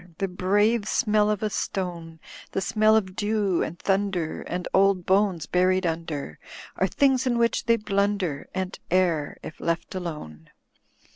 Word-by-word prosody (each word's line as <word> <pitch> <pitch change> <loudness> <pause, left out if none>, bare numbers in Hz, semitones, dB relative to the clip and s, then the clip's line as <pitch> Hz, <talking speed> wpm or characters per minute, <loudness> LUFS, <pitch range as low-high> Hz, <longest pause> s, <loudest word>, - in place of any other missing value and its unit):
The 195 - -1
brave 205 +4 +1
smell 210 -3 +2
of 210 0 -1
a 215 - 0
stone. 170 -5 -4 0.3
The - - 0
smell 215 +4 +3
of 190 -4 0
dew 205 -3 0
and 170 - -3
thmider 195 -5 -1
And 180 +1 -3
old 195 -2 +3
bones 190 -5 +2
bvried 185 +3 +2
mider. 160 - -4 0.4
Are 190 - +1
thi«gs 265 +4 +2
in 240 -1 +1
which 235 0 +1
they 230 0 +4
blmider 200 -7 -1
And 190 0 -4
err, 170 -5 +1
if - - -9
left 170 0 -2
alone. 150 - -7
190 Hz, 150 wpm, -25 LUFS, 170-210 Hz, 0.4 s, they